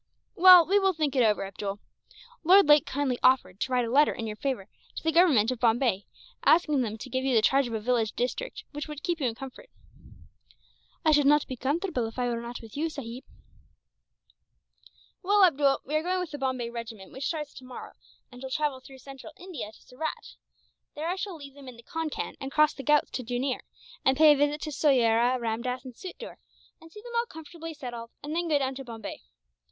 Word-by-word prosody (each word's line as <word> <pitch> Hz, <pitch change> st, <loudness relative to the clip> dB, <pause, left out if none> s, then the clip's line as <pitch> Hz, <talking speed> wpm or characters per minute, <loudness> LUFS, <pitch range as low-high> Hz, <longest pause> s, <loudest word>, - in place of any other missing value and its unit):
"Well, 360 Hz, -1 st, +9 dB
we 400 Hz, +4 st, +3 dB
will 385 Hz, -1 st, +2 dB
think 305 Hz, -4 st, -1 dB
it 255 Hz, -, +4 dB
over, 210 Hz, -3 st, +2 dB
Abdool. 195 Hz, +1 st, -5 dB, 0.7 s
Lord 375 Hz, +1 st, +6 dB
Lake 295 Hz, -1 st, +6 dB
kindly 265 Hz, -3 st, -1 dB
offered 250 Hz, -8 st, +3 dB
to 260 Hz, -, -2 dB
write 250 Hz, -1 st, +2 dB
a 230 Hz, -, -4 dB
letter 290 Hz, +4 st, +5 dB
in 225 Hz, -, -5 dB
your 215 Hz, -1 st, -4 dB
favour 245 Hz, -5 st, -3 dB, 0.3 s
to -, -, -6 dB
the 320 Hz, -, +2 dB
Government 300 Hz, -, +4 dB
of 255 Hz, -, -4 dB
Bombay, 230 Hz, -4 st, +1 dB, 0.4 s
asking 305 Hz, -4 st, +4 dB
them 220 Hz, -2 st, -3 dB
to 260 Hz, -, -9 dB
give 260 Hz, +1 st, -1 dB
you 265 Hz, -2 st, +1 dB
the 220 Hz, -, +5 dB
charge 270 Hz, +2 st, +3 dB
of 230 Hz, -, -4 dB
a -, -, -1 dB
village 225 Hz, -1 st, 0 dB
district, 255 Hz, -, -3 dB
which 295 Hz, +1 st, -6 dB
would 300 Hz, -1 st, -8 dB
keep 345 Hz, -2 st, -1 dB
you 270 Hz, -, 0 dB
in 225 Hz, -, -3 dB
comfort." 265 Hz, +1 st, -10 dB, 1.4 s
"I 310 Hz, -, +5 dB
should 290 Hz, -2 st, +4 dB
not 295 Hz, 0 st, +4 dB
be 260 Hz, -, -6 dB
comfortable 280 Hz, -, -1 dB
if 225 Hz, -, -11 dB
I 245 Hz, -1 st, 0 dB
were 235 Hz, -1 st, -2 dB
not 235 Hz, +1 st, -7 dB
with 225 Hz, -2 st, -13 dB
you, 320 Hz, +3 st, -1 dB
sahib." 255 Hz, -4 st, -7 dB, 2.0 s
"Well, 405 Hz, +1 st, +4 dB
Abdool, 280 Hz, -5 st, +2 dB
we 290 Hz, -, -6 dB
are 310 Hz, -, +2 dB
going 365 Hz, +2 st, -1 dB
with 360 Hz, -3 st, -4 dB
the 290 Hz, -, -6 dB
Bombay 255 Hz, -3 st, -2 dB
regiment 230 Hz, -4 st, -8 dB
which 265 Hz, +1 st, -4 dB
starts 300 Hz, -3 st, -4 dB
tomorrow, 255 Hz, -1 st, -10 dB, 0.4 s
and 250 Hz, 0 st, -12 dB
shall 265 Hz, -, -6 dB
travel 295 Hz, -1 st, -1 dB
through 265 Hz, +1 st, -14 dB
Central 275 Hz, +3 st, -11 dB
India 345 Hz, -, -7 dB
to -, -, -20 dB
Surat. 310 Hz, +5 st, -6 dB, 0.6 s
There 310 Hz, +2 st, -4 dB
I 360 Hz, -, 0 dB
shall 385 Hz, -1 st, -5 dB
leave 280 Hz, -3 st, -11 dB
them 280 Hz, -1 st, -14 dB
in 250 Hz, -2 st, -10 dB
the 235 Hz, -, -15 dB
Concan, 325 Hz, +1 st, -4 dB
and 270 Hz, 0 st, -5 dB
cross 305 Hz, +1 st, +4 dB
the -, -, -8 dB
Ghauts 295 Hz, +2 st, +2 dB
to 255 Hz, -, -4 dB
Jooneer, 245 Hz, +2 st, -2 dB, 0.4 s
and 265 Hz, 0 st, +3 dB
pay 310 Hz, -1 st, +8 dB
a -, -, +1 dB
visit 290 Hz, +1 st, 0 dB
to 305 Hz, -, -4 dB
Soyera, 245 Hz, -4 st, +3 dB
Ramdass, 240 Hz, +2 st, -3 dB
and 255 Hz, -, -8 dB
Sufder, 375 Hz, -, -9 dB, 0.4 s
and 325 Hz, 0 st, -15 dB
see 420 Hz, +3 st, -12 dB
them 480 Hz, -, -10 dB
all 470 Hz, 0 st, +1 dB
comfortably 325 Hz, -1 st, -9 dB
settled; 240 Hz, -5 st, -7 dB
and 300 Hz, +2 st, -4 dB
then 345 Hz, 0 st, -1 dB
go 305 Hz, -3 st, +3 dB
down 270 Hz, -1 st, -1 dB
to 270 Hz, +1 st, -7 dB
Bombay. 230 Hz, -3 st, -8 dB
270 Hz, 215 wpm, -27 LUFS, 245-310 Hz, 2.0 s, Well